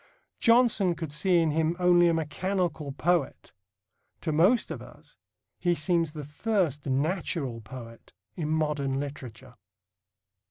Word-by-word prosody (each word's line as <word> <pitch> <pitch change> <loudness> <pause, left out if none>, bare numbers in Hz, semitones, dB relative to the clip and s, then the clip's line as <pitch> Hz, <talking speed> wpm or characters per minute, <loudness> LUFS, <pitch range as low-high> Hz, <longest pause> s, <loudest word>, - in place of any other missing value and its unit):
Johnson 230 -7 +4
could 160 -3 -6
see 180 +4 +2
in 165 -2 +2
him 160 +2 0
only 175 -1 +5
a 170 - +3
"mechanical 165 -1 -2
poet." 165 +1 -1 0.7
To 160 - -2
most 180 +11 +3
of - - -5
us - - -16 0.4
he 175 -1 +1
seems 165 0 0
the 150 -3 -7
first 155 - -1
natural 140 -3 -1
poet 115 0 -11 0.2
in 155 -4 -3
modern 150 -4 0
literature. 135 -6 -8
160 Hz, 125 wpm, -27 LUFS, 145-180 Hz, 0.7 s, only